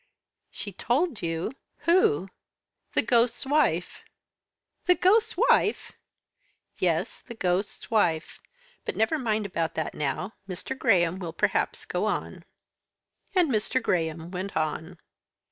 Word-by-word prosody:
"She 205 - -7
told 250 - 0
you? 165 0 -2 0.3
Who?" 195 - +3 0.6
"The - - +3
ghost's 235 +1 +2
wife." 265 - +1 0.8
"The 360 - +5
ghost's 435 +6 +3
wife!" 430 -1 +3 0.9
"Yes, - - 0
the 235 - -10
ghost's 185 +2 -1
wife. 170 -7 +1 0.4
But - - -3
never 220 +9 +1
mind 220 -4 0
about 170 -4 -2
that 160 - -2
now. 150 +8 -2 0.2
Mr. 180 +6 -4
Graham 185 -9 +3
will 170 -3 -5
perhaps - - 0
go - - -1
on." - - -3 0.9
And 350 -6 +4
Mr. 220 +3 +1
Graham 165 -6 -1
went 190 +1 -4
on. 160 +2 -2
200 Hz, 120 wpm, -27 LUFS, 170-260 Hz, 0.9 s, The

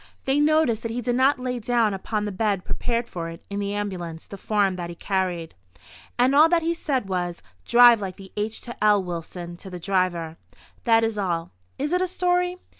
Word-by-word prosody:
They 270 +2 +2
noticed 295 -7 +3
that 230 - -4
he 240 - -3
did 245 0 -1
not 265 +2 +4
lay 250 -1 -3
down 230 -2 +1
upon 210 +2 -2
the 205 - -3
bed 200 -1 -1
prepared 235 0 -2
for 165 -5 -5
it 165 - -10
in 200 - -2
the 200 0 -2
ambulance 175 -5 -4
the - - -9
form 200 -1 +1
that 175 -1 -5
he 170 - -7
carried, 180 -3 -2 0.6
and 250 +2 +4
all 305 +3 +7
that 335 -1 +2
he 335 +1 +1
said 275 - -2
was: 175 -2 -3 0.2
"Drive 240 -2 +7
like 190 -1 -5 0.2
h––––l, 210 -1 0
Wilson," 175 0 -6
to 190 - -10
the 180 -1 -7
driver. 175 -3 -1 0.5
That 225 -1 +5
is 225 -2 -1
all. 170 -4 -2 0.3
Is 290 +3 -2
it 360 - +2
a 370 - +1
story? 360 0 0
210 Hz, 195 wpm, -24 LUFS, 185-250 Hz, 0.6 s, all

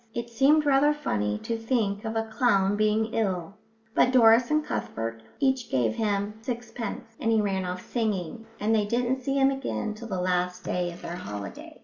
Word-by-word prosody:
It 235 0 -4
seemed 285 +6 +4
rather 290 +1 +4
funny 105 - -1
to 230 - -2
think 225 -3 -1
of 220 0 -3
a 225 - +1
clown 210 -3 +2
being 215 +1 +1
ill, 190 -4 -1 0.4
but 255 - +4
Doris 235 -1 +6
and 305 0 +2
Cuthbert 115 - -4 0.2
each 265 -3 +1
gave 120 -4 +1
him 205 - -1
sixpence, 235 -2 -5
and 225 - +1
he 220 - +4
ran 195 -3 0
off 180 0 -5
singing, 220 -1 -2
and 215 +2 +1
they 215 -2 +3
didn't 245 +3 0
see 275 +2 -1
him 270 0 +4
again 265 -5 -3
till 230 +2 -9
the 190 -4 -3
last 180 0 0
day 175 -1 -1
of 170 - -12
their 175 - -5
holiday. 105 - -8
220 Hz, 190 wpm, -27 LUFS, 185-245 Hz, 0.4 s, Doris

